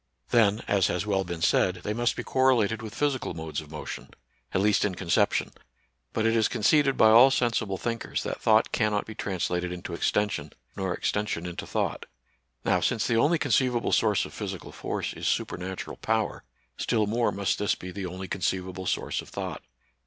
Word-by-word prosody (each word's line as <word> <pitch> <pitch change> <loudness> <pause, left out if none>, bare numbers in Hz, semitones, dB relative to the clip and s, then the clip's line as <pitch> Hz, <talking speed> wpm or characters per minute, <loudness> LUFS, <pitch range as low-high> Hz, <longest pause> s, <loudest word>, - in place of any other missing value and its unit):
Then, 110 -2 +3
as 100 -2 +3
has 90 - -1
well 100 -2 +1
been 85 -2 -5
said, 90 +1 +3
they 105 - -1
must 120 +1 +1
be - - -4
correlated 120 -4 +2
with 110 -2 -8
physical 145 -3 -1
modes 80 0 -4
of 75 - -14
motion, 75 0 -7 0.4
at - - +1
least 105 +1 +3
in 100 -3 0
conception; 85 -1 +1 0.6
but 110 - -1
it 115 0 +3
is 110 -2 +4
conceded 140 +4 +3
by 110 - +7
all 120 +4 +9
sensible 115 -6 0
thinkers 115 +3 -3
that - - -4
thought - - +4
cannot 105 -1 +1
be 110 - -8
translated 90 -3 -2
into 90 -1 -6
extension, 85 -4 -1 0.2
nor 95 -1 -2
extension 105 -3 -1
into 90 -1 -6
thought. - - -2 0.6
Now, - - +3
since 115 -3 0
the 115 - +2
only 150 +8 +4
conceivable 130 -4 +1
source 105 -3 +3
of - - -10
physical - - -6
force - - -4
is - - -4
supernatural 95 +1 -3
power, - - -1 0.3
still 110 -3 +1
more 115 +3 +1
must 100 -1 -1
this 105 - +1
be 90 - -8
the 95 -1 -4
only 95 +2 -6
conceivable 95 -1 -2
source - - -1
of - - -14
thought. - - -5
105 Hz, 180 wpm, -27 LUFS, 90-115 Hz, 0.6 s, all